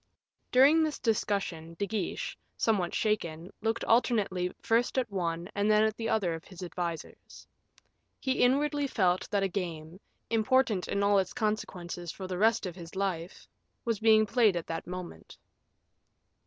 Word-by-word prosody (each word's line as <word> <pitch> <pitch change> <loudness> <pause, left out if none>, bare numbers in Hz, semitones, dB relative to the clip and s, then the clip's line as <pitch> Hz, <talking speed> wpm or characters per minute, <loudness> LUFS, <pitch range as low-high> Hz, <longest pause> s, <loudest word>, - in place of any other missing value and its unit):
During 280 +6 +6
this 310 -1 0
discussion, 195 -7 -1
De 200 - 0
Guiche, 210 +1 -3 0.2
somewhat 200 -6 +1
shaken, 175 -5 -1
looked 225 +1 -1
alternately 200 -6 +2
first 235 +3 +1
at 245 -4 0
one 170 -3 -2
and 205 +1 +1
then 215 0 +5
at 220 0 +1
the 225 -1 -3
other 190 -6 +1
of 165 0 -6
his 185 -1 -10
advisers. 170 -2 -6 0.7
He 260 -1 +1
inwardly 285 +3 +2
felt 185 -8 +1
that 200 -2 +1
a - - +2
game, 170 -2 -5 0.3
important 225 -3 +2
in 200 0 0
all 200 0 +4
its 190 -1 -2
consequences 180 -6 -3
for 190 - -8
the 185 -1 -4
rest 225 +1 +3
of 180 -2 -5
his 170 0 -10
life, 185 -2 -3 0.4
was 230 -3 0
being 220 -1 +5
played 215 -3 +3
at 170 - -3
that 165 0 -5
moment. 180 -1 -8
200 Hz, 155 wpm, -30 LUFS, 175-225 Hz, 0.7 s, During